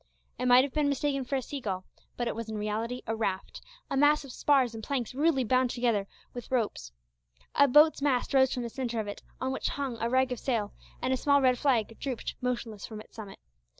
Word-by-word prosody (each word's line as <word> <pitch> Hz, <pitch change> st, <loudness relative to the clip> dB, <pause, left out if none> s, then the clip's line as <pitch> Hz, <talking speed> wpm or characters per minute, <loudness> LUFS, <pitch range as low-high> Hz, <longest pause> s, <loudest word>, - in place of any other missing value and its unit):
It 250 Hz, -, 0 dB
might 250 Hz, +1 st, +7 dB
have 275 Hz, -, -4 dB
been 300 Hz, -2 st, +2 dB
mistaken 275 Hz, -1 st, -1 dB
for 275 Hz, -, -2 dB
a 260 Hz, -, -1 dB
seagull, 205 Hz, -9 st, -4 dB, 0.3 s
but 240 Hz, -, -1 dB
it -, -, -1 dB
was 230 Hz, -1 st, -5 dB
in 220 Hz, -, -4 dB
reality 220 Hz, +4 st, -3 dB
a 225 Hz, -, -2 dB
raft 195 Hz, -4 st, -3 dB, 0.3 s
a -, -, -3 dB
mass 295 Hz, +2 st, +4 dB
of 270 Hz, -, -9 dB
spars 265 Hz, -3 st, +2 dB
and 220 Hz, -1 st, -7 dB
planks 250 Hz, -3 st, -2 dB
rudely 285 Hz, -1 st, +2 dB
bound 255 Hz, +2 st, +2 dB
together 235 Hz, -5 st, 0 dB, 0.3 s
with 245 Hz, -2 st, -8 dB
ropes. 215 Hz, -, -1 dB, 0.6 s
A 285 Hz, -, +5 dB
boat's 300 Hz, +3 st, +5 dB
mast 275 Hz, -2 st, +1 dB
rose 265 Hz, -1 st, +5 dB
from 250 Hz, -, -2 dB
the 235 Hz, -, -4 dB
centre 240 Hz, -2 st, -3 dB
of 215 Hz, -, -3 dB
it, 205 Hz, -, -6 dB, 0.2 s
on 260 Hz, 0 st, -1 dB
which 265 Hz, -, -2 dB
hung 270 Hz, -5 st, -4 dB
a 230 Hz, -, 0 dB
rag 260 Hz, +1 st, +2 dB
of 250 Hz, -, -3 dB
sail, 225 Hz, -6 st, -1 dB, 0.3 s
and 260 Hz, +1 st, +1 dB
a -, -, +1 dB
small 280 Hz, +2 st, +3 dB
red 255 Hz, -2 st, +3 dB
flag 230 Hz, -6 st, +1 dB
drooped 260 Hz, -4 st, -4 dB
motionless 235 Hz, -4 st, -3 dB
from 215 Hz, -2 st, -8 dB
its 215 Hz, -, -14 dB
summit. 210 Hz, -3 st, -9 dB
250 Hz, 225 wpm, -29 LUFS, 225-270 Hz, 0.6 s, might